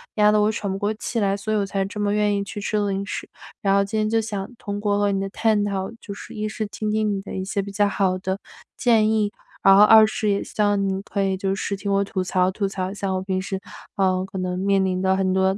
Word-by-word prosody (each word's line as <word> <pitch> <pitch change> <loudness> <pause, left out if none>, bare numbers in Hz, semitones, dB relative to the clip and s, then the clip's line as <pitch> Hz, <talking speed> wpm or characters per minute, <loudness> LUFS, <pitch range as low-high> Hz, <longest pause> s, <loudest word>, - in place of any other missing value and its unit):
压 210 -1 +5
得 210 - +3
我 210 - +3
喘 205 -3 -3
不 195 - -2
过 205 +1 0
气 230 +1 -3
来， 200 -2 +1
所 215 +2 -3
以 - - +2
我 200 - +1
才 195 0 -1
这 210 +2 -7
么 205 0 +1
愿 210 -1 +2
意 - - -1
去 205 +1 -7
吃 215 +1 -1
零 200 -1 -1
食， - - -5 0.3
然 195 -3 +3
后 200 - +4
今 200 +2 -3
天 215 0 +1
就 225 0 +2
想 205 -1 -4
通 205 0 -5
过 205 -1 +1
和 205 0 +2
你 195 - 0
的 195 - -2
探 215 0 +1
讨， 195 -1 -2
就 200 - -7
是， - - -10
一 215 0 -3
是 215 0 -3
听 215 +1 -4
听 215 0 +1
你 195 - -3
的 - - -8
一 190 - -2
些 200 +1 -1
比 200 - -7
较 205 +1 +2
好 190 -2 +1
的 190 +1 -3 0.4
建 220 -3 +3
议， 215 -2 +2 0.3
然 195 0 +7
后 205 - +9
二 220 0 +8
是 215 -1 -1
也 200 - +1
希 - - -4
望 205 -1 +3
你 190 0 -2
可 200 0 -3
以 190 -1 +1
就 195 0 -1
是 200 - -2
听 200 +1 -3
我 195 0 +3
吐 195 -2 -2
槽 185 0 +1
吐 200 +1 -2
槽， 190 0 -3
像 195 -1 -2
我 185 - -1
平 190 -1 -2
时， 190 0 -4 0.4
嗯， 185 -1 +2
可 190 0 -8
能 180 0 -2
面 195 0 +2
临 185 0 -1
的 190 0 +2
很 190 -1 +1
多 190 +1 +2
200 Hz, 305 characters per minute, -23 LUFS, 190-210 Hz, 0.4 s, 后